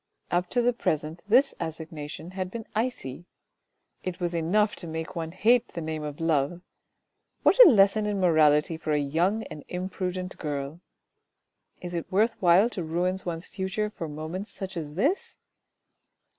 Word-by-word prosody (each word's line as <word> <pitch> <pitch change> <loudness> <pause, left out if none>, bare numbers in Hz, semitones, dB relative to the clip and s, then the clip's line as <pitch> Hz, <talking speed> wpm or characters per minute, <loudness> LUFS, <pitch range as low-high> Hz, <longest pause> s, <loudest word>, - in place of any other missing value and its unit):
Up 175 +1 +1
to 245 - +1
the 245 +1 +3
present 155 -6 -2
this 260 +6 +5
assignation 160 0 -6
had 185 -1 -4
been 225 +2 -6
icy. 195 - -3 0.8
It 185 -1 -4
was 175 -1 -1
enough 195 +6 +2
to 175 - -5
make 160 +2 -5
one 165 -1 -3
hate 230 +6 +2
the - - -2
name 155 -1 -4
of 150 -1 -6
love. 165 +1 0 0.8
What - - +8
a 385 - +9
lesson 210 -2 +4
in 205 -1 -1
morality 155 -3 +4
for 155 -1 -2
a - - +3
young 170 +10 +1
and 155 -7 -9
imprudent 185 0 -4
girl! 145 +1 -4 1.0
Is 175 -1 -6
it 170 +2 -4
worth 220 +4 +3
while 180 +4 +6
to 180 - -4
ruin 175 +3 0
one's 170 0 -3
future 205 +2 -3
for 165 -6 -6
moments 160 +7 -5
such 190 -2 -7
as 150 -3 -5
this 285 - 0
175 Hz, 160 wpm, -27 LUFS, 160-200 Hz, 1.0 s, a